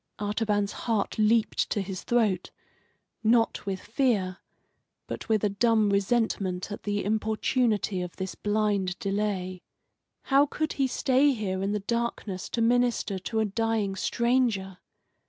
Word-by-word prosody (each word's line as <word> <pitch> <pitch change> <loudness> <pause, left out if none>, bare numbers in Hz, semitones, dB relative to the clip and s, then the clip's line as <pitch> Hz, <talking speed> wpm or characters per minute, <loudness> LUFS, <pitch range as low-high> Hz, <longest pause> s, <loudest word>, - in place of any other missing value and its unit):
Artaban's 205 -1 0
heart 220 -2 -2
leaped 220 +1 +2
to - - 0
his 190 -1 -4
throat, 215 -7 +1 0.7
not 225 -2 +2
with 190 -1 -2
fear, 215 -6 0 0.7
but - - -7
with 220 -2 +2
a 210 - +3
dumb 215 0 +2
resentment 200 -2 0
at 205 - -5
the 205 0 -2
importunity 215 -1 0
of 180 -1 -6
this 190 0 -4
blind 205 -3 0
delay. 195 -3 -2 0.6
How 280 +1 +4
could 310 +1 -2
he 270 -1 +1
stay 265 +2 +3
here 190 -5 -2
in 195 +1 0
the 210 - 0
darkness 220 -3 -3
to 230 - 0
minister 240 -4 +1
to 220 +4 -1
a - - +2
dying 215 -1 -1
stranger? 230 -4 0
210 Hz, 135 wpm, -27 LUFS, 195-235 Hz, 0.7 s, How